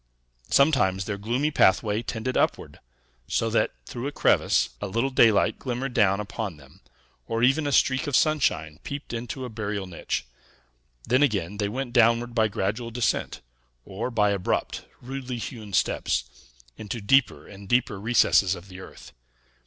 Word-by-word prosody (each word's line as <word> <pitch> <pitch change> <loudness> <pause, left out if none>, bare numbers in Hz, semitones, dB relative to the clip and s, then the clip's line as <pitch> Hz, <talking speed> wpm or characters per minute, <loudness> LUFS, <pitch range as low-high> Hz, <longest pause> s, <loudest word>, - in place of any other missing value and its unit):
Sometimes 120 -11 +3
their 100 -2 -4
gloomy 125 +9 -1
pathway 105 -3 +3
tended 120 +2 -4
upward, - - -1 0.5
so - - 0
that, - - +2
through 120 - -5
a - - -3
crevice, - - +2
a 105 - -2
little 115 +7 -1
daylight 115 -5 +4
glimmered 125 0 -4
down 100 -4 +3
upon 105 -4 -5
them, 70 -2 -18 0.5
or 115 0 -1
even 135 +4 +3
a - - -1
streak 130 +2 +2
of 145 - 0
sunshine 80 - +1
peeped 140 -3 -7
into 120 +3 -5
a - - -6
burial 105 -3 -4
niche; 85 -7 -4 0.8
then 130 +3 +3
again, 105 - 0
they 100 -1 -1
went 125 +2 -4
downward 120 0 +3
by 110 -2 +3
gradual 105 +3 -3
descent, 120 0 -1 0.4
or 100 +6 -4
by 105 -4 +2
abrupt, 100 -2 -2 0.2
rudely 130 0 -5
hewn 110 -3 -7
steps, 95 -9 0 0.5
into 110 +2 -5
deeper 130 +6 +2
and 100 -1 -12
deeper 120 -4 +1
recesses 105 -4 +3
of 90 +2 -12
the 90 0 -10
earth. 65 -8 -12
115 Hz, 155 wpm, -25 LUFS, 100-125 Hz, 0.8 s, daylight